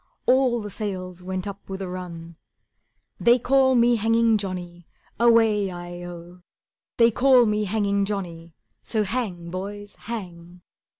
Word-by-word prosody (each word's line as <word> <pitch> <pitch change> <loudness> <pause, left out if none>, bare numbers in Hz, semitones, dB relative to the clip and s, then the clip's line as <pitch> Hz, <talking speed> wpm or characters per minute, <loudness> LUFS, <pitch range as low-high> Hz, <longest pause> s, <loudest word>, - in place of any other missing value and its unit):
All 255 -2 +3
the 205 - -7
sails 185 -4 -5
went 185 0 -4
up 200 -1 -8
with 190 0 -5
a 190 - -4
run: 170 -2 -8 0.8
"They 240 +1 +5
call 260 +1 +3
me 240 0 +4
Hanging 225 0 +3
Johnny, 175 -3 -6 0.3
Away 225 -4 +4
i 175 0 -8
oh; 175 +1 -10 0.6
They 230 0 +5
call 250 +1 +5
me 210 -1 0
Hanging 200 -1 0
Johnny, 170 -5 -6 0.3
So 220 -2 -1
hang, 190 -6 -4
boys, 205 +2 -6
hang." 180 -6 -8
200 Hz, 135 wpm, -24 LUFS, 180-230 Hz, 0.8 s, They